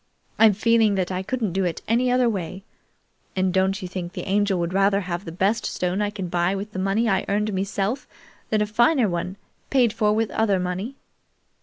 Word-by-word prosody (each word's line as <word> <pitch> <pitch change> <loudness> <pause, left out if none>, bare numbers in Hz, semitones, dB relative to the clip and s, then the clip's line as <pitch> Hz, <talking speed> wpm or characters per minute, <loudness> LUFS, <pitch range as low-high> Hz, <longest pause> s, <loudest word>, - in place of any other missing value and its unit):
I'm 220 -2 +7
feeling 220 0 +3
that 185 -1 -1
I 185 0 -2
couldn't 220 -2 -2
do 185 -2 +1 0.2
any 240 +3 +2
other 250 0 +3
way, 190 -3 -3 0.7
and 185 -1 +1
don't 190 +1 +2
you - - -3
think 180 -1 -6
the - - -6
Angel 200 0 +2
would 170 0 -2
rather 195 +1 +3
have 180 0 -4
the 165 - -6
best 200 +6 0
stone 180 +2 -1
I 205 - +1
can 200 -3 -5
buy 175 +2 0
with 200 +2 -5
the 185 - -5
money 195 +5 +1
I 190 -2 +2
earned 210 +1 0
meself 200 +6 -2 0.4
than 215 -1 +2
a - - 0
finer 235 +4 +3
one 180 +1 -3 0.3
paid 245 -5 +3
for 215 -2 +2
with 220 +1 0
other 205 -4 +1
money?" 185 +8 -3
200 Hz, 200 wpm, -23 LUFS, 185-220 Hz, 0.7 s, I'm